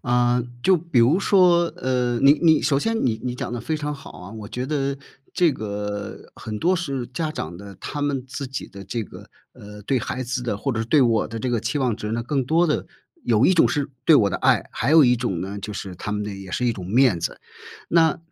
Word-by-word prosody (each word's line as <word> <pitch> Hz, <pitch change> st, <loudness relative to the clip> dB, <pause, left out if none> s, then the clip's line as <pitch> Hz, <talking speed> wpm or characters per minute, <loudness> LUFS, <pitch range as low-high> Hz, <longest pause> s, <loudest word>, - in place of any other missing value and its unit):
啊， 120 Hz, 0 st, +2 dB, 0.2 s
就 190 Hz, -1 st, +5 dB
比 160 Hz, -6 st, -1 dB
如 140 Hz, +11 st, +4 dB
说， 180 Hz, -4 st, +4 dB
呃， 125 Hz, -2 st, 0 dB
你 140 Hz, +1 st, +7 dB
你， 160 Hz, -2 st, +5 dB
首 140 Hz, -1 st, +2 dB
先 225 Hz, +6 st, -1 dB
你 115 Hz, -3 st, 0 dB
你 125 Hz, -1 st, -3 dB
讲 125 Hz, -, -5 dB
得 120 Hz, -, -3 dB
非 155 Hz, +6 st, -2 dB
常 150 Hz, 0 st, -3 dB
好 140 Hz, -, -11 dB
啊。 90 Hz, +2 st, -11 dB
我 110 Hz, -2 st, -8 dB
觉 125 Hz, +1 st, -4 dB
得 140 Hz, -1 st, -1 dB, 0.4 s
这 170 Hz, -4 st, +3 dB
个， 105 Hz, -2 st, -5 dB
很 105 Hz, -1 st, -6 dB
多 180 Hz, -, +2 dB
是 140 Hz, -8 st, -3 dB
家 155 Hz, +5 st, -3 dB
长 90 Hz, -, -6 dB
的， 100 Hz, 0 st, -10 dB
他 145 Hz, -, -5 dB
们 140 Hz, -3 st, -1 dB
自 135 Hz, +1 st, -5 dB
己 135 Hz, +1 st, -6 dB
的 100 Hz, -, -10 dB
这 115 Hz, +4 st, -3 dB
个， -, -, -13 dB, 0.2 s
呃， 105 Hz, 0 st, -12 dB
对 130 Hz, +5 st, 0 dB
孩 130 Hz, -, -4 dB
子 125 Hz, 0 st, -3 dB
的， 115 Hz, -4 st, -2 dB
或 135 Hz, +6 st, -2 dB
者 115 Hz, -, -2 dB
是 -, -, -1 dB
对 140 Hz, +2 st, +4 dB
我 115 Hz, -4 st, +2 dB
的 115 Hz, -, -6 dB
这 125 Hz, +3 st, -2 dB
个 120 Hz, -2 st, 0 dB
期 145 Hz, +6 st, -2 dB
望 125 Hz, -4 st, +1 dB
值 105 Hz, 0 st, -5 dB
呢， 115 Hz, -, -1 dB
更 135 Hz, +2 st, -1 dB
多 165 Hz, +6 st, +3 dB
的 150 Hz, -, -1 dB, 0.4 s
有 115 Hz, +1 st, +3 dB
一 190 Hz, -, +5 dB
种 170 Hz, -, +4 dB
是 145 Hz, -1 st, -1 dB, 0.2 s
对 160 Hz, -, +8 dB
我 100 Hz, -6 st, +3 dB
的 -, -, -1 dB
爱， -, -, +2 dB
还 140 Hz, -, -1 dB
有 160 Hz, -2 st, +7 dB
一 125 Hz, -1 st, +5 dB
种 115 Hz, -8 st, -2 dB
呢， 100 Hz, +2 st, -5 dB
就 105 Hz, +1 st, -6 dB
是 95 Hz, -2 st, -6 dB
他 95 Hz, -, -6 dB
们 105 Hz, -, -2 dB
的 105 Hz, -1 st, -5 dB
也 95 Hz, -1 st, -9 dB
是 125 Hz, -, -1 dB
一 120 Hz, -, +2 dB
种 95 Hz, -5 st, -8 dB
面 115 Hz, -1 st, +3 dB
子。 -, -, -4 dB, 0.5 s
那， 160 Hz, -2 st, +3 dB
125 Hz, 265 characters per minute, -23 LUFS, 105-145 Hz, 0.5 s, 对